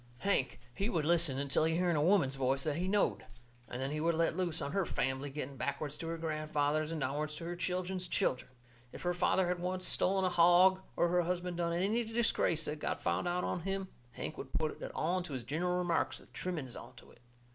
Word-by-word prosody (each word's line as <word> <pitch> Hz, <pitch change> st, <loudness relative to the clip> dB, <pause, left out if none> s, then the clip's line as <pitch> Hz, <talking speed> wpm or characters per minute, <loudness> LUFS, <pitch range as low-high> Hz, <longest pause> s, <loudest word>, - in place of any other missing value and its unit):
Hank, 195 Hz, -12 st, +1 dB
he 200 Hz, -, -1 dB
would 165 Hz, -8 st, 0 dB
listen 165 Hz, -5 st, +3 dB
until 140 Hz, +2 st, +1 dB
he 160 Hz, 0 st, +1 dB
hearn 175 Hz, -1 st, +2 dB
a 150 Hz, -, +2 dB
woman's 170 Hz, -5 st, +4 dB
voice 135 Hz, 0 st, 0 dB
that 150 Hz, -1 st, -1 dB
he 180 Hz, +2 st, -1 dB
knowed, 205 Hz, +1 st, +1 dB, 0.5 s
and 125 Hz, -, -5 dB
then 135 Hz, +1 st, -2 dB
he 150 Hz, 0 st, -2 dB
would 165 Hz, +1 st, +2 dB
let 165 Hz, 0 st, +1 dB
loose 175 Hz, -3 st, -1 dB
on 140 Hz, -2 st, -3 dB
her 195 Hz, -, +1 dB
fambly, 130 Hz, -2 st, -1 dB
going 140 Hz, -1 st, -6 dB
backwards 140 Hz, +2 st, -3 dB
to 165 Hz, -, -5 dB
her 165 Hz, 0 st, -2 dB
grandfathers 155 Hz, -1 st, 0 dB
and 165 Hz, -, -2 dB
downwards 150 Hz, +3 st, -2 dB
to 160 Hz, -, -8 dB
her 175 Hz, +1 st, -3 dB
children's 180 Hz, +1 st, -2 dB
children. 125 Hz, -6 st, 0 dB, 0.4 s
If -, -, -9 dB
her 175 Hz, 0 st, +1 dB
father 180 Hz, +1 st, +2 dB
had 180 Hz, 0 st, -1 dB
once 185 Hz, +1 st, -2 dB
stolen 190 Hz, 0 st, +2 dB
a -, -, +3 dB
hog, 180 Hz, +2 st, +6 dB
or 170 Hz, -, +3 dB
her 180 Hz, +1 st, +3 dB
husband 175 Hz, 0 st, -2 dB
done 170 Hz, -1 st, 0 dB
any 200 Hz, +7 st, +1 dB
disgrace 225 Hz, -8 st, +1 dB
that 150 Hz, 0 st, -4 dB
got -, -, -2 dB
found -, -, 0 dB
out 180 Hz, +1 st, 0 dB
on -, -, -1 dB
him, 195 Hz, +2 st, -3 dB, 0.2 s
Hank 155 Hz, -, -5 dB
would 130 Hz, -, -8 dB
put 155 Hz, -1 st, -1 dB
it -, -, -5 dB
all 175 Hz, +4 st, +1 dB
into 175 Hz, -5 st, -6 dB
his 130 Hz, -2 st, -4 dB
gineral 175 Hz, +8 st, 0 dB
remarks, 175 Hz, -2 st, 0 dB
with -, -, -19 dB
trimmings 155 Hz, -9 st, -4 dB
onto 120 Hz, 0 st, -12 dB
it. -, -, -20 dB
170 Hz, 225 wpm, -33 LUFS, 150-180 Hz, 0.5 s, hog